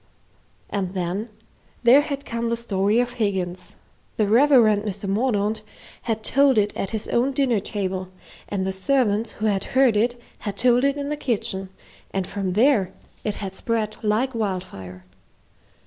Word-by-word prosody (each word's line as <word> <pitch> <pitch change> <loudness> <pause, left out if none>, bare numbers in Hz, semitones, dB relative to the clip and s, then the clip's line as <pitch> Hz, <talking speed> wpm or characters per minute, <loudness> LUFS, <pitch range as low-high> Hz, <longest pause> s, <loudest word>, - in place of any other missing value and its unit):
And 195 -2 -2
then 185 +5 -2 0.5
there 250 +4 +7
had 280 -2 -5
come 235 0 -2
the 235 - 0
story 205 -1 +1
of 245 0 0
Higgins. 190 -5 -3 0.4
The 215 - +3
Reverend 230 -2 +5
Mr. 205 -1 -5
Mordaunt 210 0 0 0.4
had 220 -2 -2
told 275 -2 +4
it 210 0 +2
at 195 - -3
his 220 -2 -3
own 255 +3 +1
dinner 260 -5 +2
table, 190 -2 -3 0.4
and 190 -2 -1
the 190 - -1
servants 220 +1 +1
who 215 - -4
had 200 -2 +1
heard 260 -5 +5
it 240 +3 +1 0.2
had 205 -2 -5
told 245 +2 +4
it 280 +1 +1
in 285 0 -3
the 300 - -1
kitchen, 195 -7 -2 0.4
and 195 -1 -2
from 190 -1 -3
there 220 -3 +3 0.3
it 210 -2 -2
had 195 -2 -5
spread 215 +1 -2
like 225 +5 +1
wildfire. 180 - -4
215 Hz, 160 wpm, -23 LUFS, 195-245 Hz, 0.5 s, there